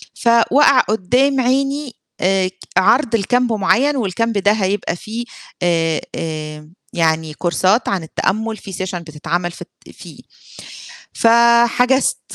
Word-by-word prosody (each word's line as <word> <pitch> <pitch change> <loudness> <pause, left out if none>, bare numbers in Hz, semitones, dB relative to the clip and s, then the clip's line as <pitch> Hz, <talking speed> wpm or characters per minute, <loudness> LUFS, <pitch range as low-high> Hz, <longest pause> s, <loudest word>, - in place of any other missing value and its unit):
فوَقَع 255 +3 +4
قُدّام 250 +7 +1
عيني 275 +1 -1 0.3
آآ، 185 0 +1 0.3
عرض 230 +6 +3
لcamp 245 +4 0
معين 230 +7 +1
والcamp 230 -1 -1
ده 200 +1 +3
هيبقى 200 -4 -1
فيه 220 +6 -7 0.4
آآ 165 -2 +1
آآ، 155 -1 -6 0.2
يعني 160 -2 0
كورسات 185 +7 0
عن 190 -4 -2
التأمُّل 220 +7 -2
في 195 - -10
session 185 0 -4
بتتعمل 170 +2 -4
في - - -14
الت - - -14
فيه - - -13 0.9
ف - - +1 0.4
حجزت 250 +3 +1
200 Hz, 120 wpm, -18 LUFS, 175-245 Hz, 0.9 s, فوَقَع